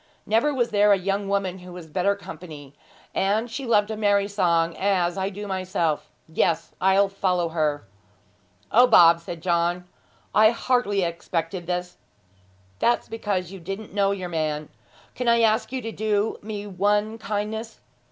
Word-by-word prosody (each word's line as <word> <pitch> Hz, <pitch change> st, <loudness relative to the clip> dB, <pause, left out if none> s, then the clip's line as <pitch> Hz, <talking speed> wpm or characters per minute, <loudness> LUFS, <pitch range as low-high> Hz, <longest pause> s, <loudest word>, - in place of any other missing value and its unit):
Never 225 Hz, +7 st, +2 dB
was 245 Hz, -4 st, 0 dB
there 205 Hz, 0 st, +4 dB
a 200 Hz, -, +5 dB
young 195 Hz, +2 st, -2 dB
woman 195 Hz, -2 st, -1 dB
who 180 Hz, 0 st, -11 dB
was 175 Hz, -2 st, -9 dB
better 185 Hz, +5 st, 0 dB
company; 155 Hz, -7 st, -10 dB, 0.4 s
and 215 Hz, +4 st, 0 dB
she 270 Hz, +1 st, -5 dB
loved 210 Hz, -2 st, +3 dB
a -, -, -2 dB
merry 205 Hz, -2 st, +2 dB
song 170 Hz, -5 st, +1 dB
as 185 Hz, -3 st, +1 dB
I 190 Hz, 0 st, -1 dB
do 205 Hz, +1 st, -7 dB
myself. 185 Hz, -6 st, -2 dB, 0.2 s
Yes, 160 Hz, +1 st, 0 dB
I'll 190 Hz, +1 st, +4 dB
follow 185 Hz, -3 st, 0 dB
her.' 155 Hz, -3 st, -1 dB, 0.9 s
'O, 245 Hz, +3 st, +6 dB
Bob,' 170 Hz, -7 st, +7 dB
said 170 Hz, -1 st, -8 dB
John; 175 Hz, 0 st, 0 dB, 0.5 s
'I 215 Hz, 0 st, +6 dB
hardly 230 Hz, -4 st, +1 dB
expected 170 Hz, +1 st, -3 dB
this!' 180 Hz, 0 st, -3 dB, 0.8 s
'That's 240 Hz, -, +1 dB
because 200 Hz, -5 st, -2 dB
you 195 Hz, -, -9 dB
didn't 195 Hz, +5 st, -7 dB
know 200 Hz, -1 st, +2 dB
your 190 Hz, -3 st, -3 dB
man. 155 Hz, -2 st, -2 dB, 0.4 s
Can 250 Hz, -, -4 dB
I 235 Hz, 0 st, +4 dB
ask 220 Hz, +1 st, +2 dB
you 260 Hz, -1 st, -4 dB
to 225 Hz, -, -4 dB
do 215 Hz, 0 st, -1 dB
me 210 Hz, -1 st, -6 dB
one 205 Hz, +3 st, 0 dB
kindness? 220 Hz, +2 st, -4 dB
195 Hz, 160 wpm, -24 LUFS, 175-210 Hz, 0.9 s, Bob